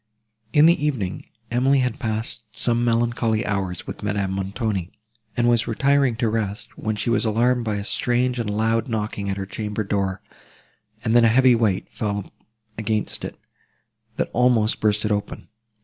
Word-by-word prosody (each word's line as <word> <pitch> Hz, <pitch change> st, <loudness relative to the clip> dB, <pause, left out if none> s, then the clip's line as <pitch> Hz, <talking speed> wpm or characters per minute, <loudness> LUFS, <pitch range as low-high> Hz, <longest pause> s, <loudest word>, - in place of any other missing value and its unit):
In 150 Hz, +5 st, +6 dB
the 165 Hz, -3 st, +4 dB
evening, 115 Hz, -11 st, -2 dB, 0.2 s
Emily 130 Hz, +3 st, +3 dB
had 125 Hz, 0 st, -1 dB
passed 110 Hz, -1 st, -3 dB
some 120 Hz, -1 st, 0 dB
melancholy 115 Hz, -1 st, +1 dB
hours 95 Hz, -4 st, -2 dB
with -, -, -7 dB
Madame 100 Hz, -2 st, -1 dB
Montoni, 95 Hz, -1 st, -2 dB, 0.5 s
and 120 Hz, 0 st, +3 dB
was 120 Hz, -1 st, +3 dB
retiring 135 Hz, +1 st, +2 dB
to 115 Hz, 0 st, 0 dB
rest, 110 Hz, 0 st, -3 dB
when 110 Hz, 0 st, -2 dB
she 110 Hz, +3 st, -1 dB
was 120 Hz, -, +2 dB
alarmed 120 Hz, +2 st, +2 dB
by 105 Hz, -2 st, -1 dB
a 100 Hz, -, -3 dB
strange 125 Hz, +3 st, 0 dB
and 115 Hz, -3 st, -2 dB
loud 110 Hz, +2 st, +1 dB
knocking 105 Hz, -3 st, -3 dB
at 95 Hz, -, -2 dB
her 95 Hz, -, -3 dB
chamber 105 Hz, +2 st, -3 dB
door, 100 Hz, -2 st, -1 dB, 0.8 s
and 115 Hz, -1 st, +1 dB
then 120 Hz, -, +7 dB
a -, -, +7 dB
heavy 125 Hz, +2 st, +5 dB
weight 110 Hz, -5 st, +1 dB
fell 100 Hz, -2 st, -3 dB, 0.5 s
against 110 Hz, -1 st, -1 dB
it, -, -, -6 dB, 0.8 s
that -, -, -2 dB
almost 120 Hz, -3 st, +3 dB
burst 105 Hz, 0 st, +1 dB
it 105 Hz, -, 0 dB
open. 105 Hz, 0 st, -3 dB
110 Hz, 165 wpm, -23 LUFS, 105-120 Hz, 0.8 s, then